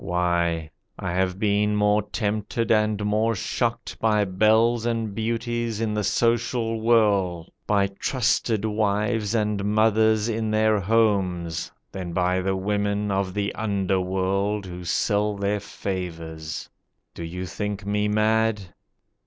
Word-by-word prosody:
Why, 85 -3 0 0.3
I 90 - -3
have 90 +1 0
been 105 0 +1
more 105 0 +3
tempted 105 +2 -2
and 105 -1 +2
more 110 +2 +1
shocked 120 +4 -2
By 105 -2 +2
belles 110 +5 +3
and 115 -3 -1
beauties 115 0 -2
in 110 -2 -1
the 105 0 -1
social 115 0 +1
whirl, 100 -7 +2 0.2
By 100 -1 +3
trusted 110 +1 0
wives 105 +1 0
and 105 -2 0
mothers 110 +1 +3
in 110 -1 -1
their 110 0 +3
homes, 95 -5 +1 0.2
Than 90 -3 -5
by 90 +1 +1
the 95 +1 0
women 100 +1 -1
of 95 -1 -1
the 100 0 -1
underworld 95 0 0
Who 90 -1 -8
sell 105 +4 +1
their 100 +1 -1
favours. 80 -6 -5 0.5
Do 85 - -7
you 90 +3 -5
think 100 +1 -4
me 105 +1 0
mad? 110 -2 +1
105 Hz, 130 wpm, -24 LUFS, 95-110 Hz, 0.5 s, more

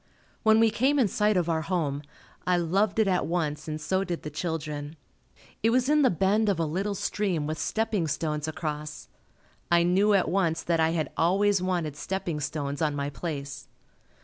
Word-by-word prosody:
When 220 0 +5
we 225 -1 +4
came 265 +6 +2
in 250 -6 +4
sight 210 +1 +1
of 175 -2 +1
our 160 -1 +1
home, 155 -5 -1 0.5
I 180 -1 +3
loved 190 +5 +1
it 220 -2 +3
at 185 -2 +1
once 155 -3 -2
and 155 0 -3
so 190 +5 0
did 175 -3 -4
the 150 - -5
children. 150 -2 -4 0.7
It 225 - +3
was 250 +3 +2
in 300 0 +4
the 265 - +5
bend 205 +4 +2
of 195 - +1
a 165 - +1
little 195 +6 -2
stream 185 -6 -1
with 155 +1 -3
stepping 215 -6 0
stones 150 0 -2
across. 150 -1 -5 0.6
I 170 0 +4
knew 195 +4 +3
at 195 - +2
once 165 -2 0
that 170 -1 +1
I 160 0 +3
had 160 -2 -1
always 195 +3 +3
wanted 175 -5 -1
stepping 170 0 -3
stones 145 0 -3
on 150 -2 +1
my 140 0 -2
place. 145 -3 -6
170 Hz, 190 wpm, -27 LUFS, 155-200 Hz, 0.7 s, When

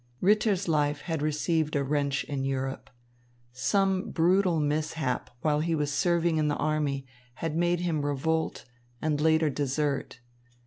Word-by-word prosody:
Ritter's 205 -1 +2
life 150 -2 +1
had 160 -3 -3
received 155 +1 0
a 140 - +2
wrench 140 0 0
in 140 -2 -3
Europe. 135 0 -3 0.6
Some 185 +10 +1
brutal 180 0 +3
mishap 150 -2 -1
while 150 -1 +2
he 165 +1 0
was 145 -2 -1
serving 170 +1 +2
in 155 -1 +2
the 145 - +1
army 145 -3 -1 0.3
had 160 +1 -3
made 175 +1 +1
him 165 -4 -1
revolt 160 +3 -1 0.3
and 150 0 0
later 160 -1 +3
desert. 140 -2 -2
155 Hz, 140 wpm, -28 LUFS, 145-165 Hz, 0.6 s, brutal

